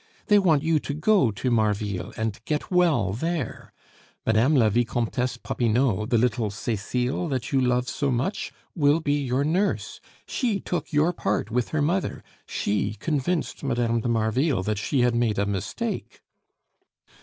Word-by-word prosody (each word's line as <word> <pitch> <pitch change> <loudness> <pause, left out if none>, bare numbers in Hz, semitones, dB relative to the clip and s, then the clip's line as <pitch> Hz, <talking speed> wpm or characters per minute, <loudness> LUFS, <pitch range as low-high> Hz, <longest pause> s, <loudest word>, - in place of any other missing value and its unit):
They 205 -1 +7
want 160 -7 +3
you 160 -1 +2
to 145 - -4
go 175 - +3
to 115 +5 -2
Marville 105 -2 0
and 110 0 -3
get 150 +3 -2
well 155 - +3
there. 160 - -3 0.5
Mme. 115 +7 +3
la 120 -5 +5
Vicomtesse 120 +2 0
Popinot, 115 -3 0
the 120 - +3
little 115 -1 +1
Cecile 125 - -2
that 130 -6 -3
you 135 - +3
love 125 0 +1
so 140 0 -1
much, 130 - -1 0.2
will 145 -1 +3
be 145 -2 0
your 130 +1 0
nurse. 180 +7 -1 0.2
She 225 -6 -1
took 170 -4 -4
your 155 +3 +3
part 105 - -1
with 120 0 0
her 155 -2 0
mother. 180 +5 -1 0.2
She 105 +1 -1
convinced 155 - -2
Mme. 120 -3 +1
de 120 - -3
Marville 115 - +1
that 105 +1 -1
she 130 +5 0
had 120 0 +3
made 120 -3 +1
a 100 - +2
mistake." 100 -2 -4
125 Hz, 155 wpm, -25 LUFS, 110-150 Hz, 0.5 s, They